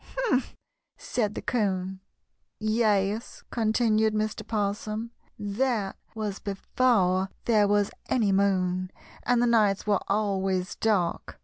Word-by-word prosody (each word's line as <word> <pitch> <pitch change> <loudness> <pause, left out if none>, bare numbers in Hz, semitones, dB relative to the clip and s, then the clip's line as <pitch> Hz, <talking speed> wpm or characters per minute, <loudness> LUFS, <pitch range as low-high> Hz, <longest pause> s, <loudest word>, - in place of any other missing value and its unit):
"Humph!" 455 - 0 0.4
said 210 -3 -2
the - - -5
'Coon. 190 -5 -1 0.6
"Yes," 215 -1 0
continued 220 -1 +2
Mr. 215 +1 -1
'Possum, 215 +1 -2 0.3
"that 210 0 -1 0.2
was 210 -3 -3
before 195 -2 +1 0.2
there 215 -3 +4
was 205 0 +2 0.2
any 220 -6 +2
moon, 185 -2 +1 0.3
and 245 -1 +2
the - - +4
nights 215 -4 +3
were 205 -3 +2
always 195 -3 0
dark. 200 -6 0
210 Hz, 110 wpm, -27 LUFS, 195-225 Hz, 0.6 s, there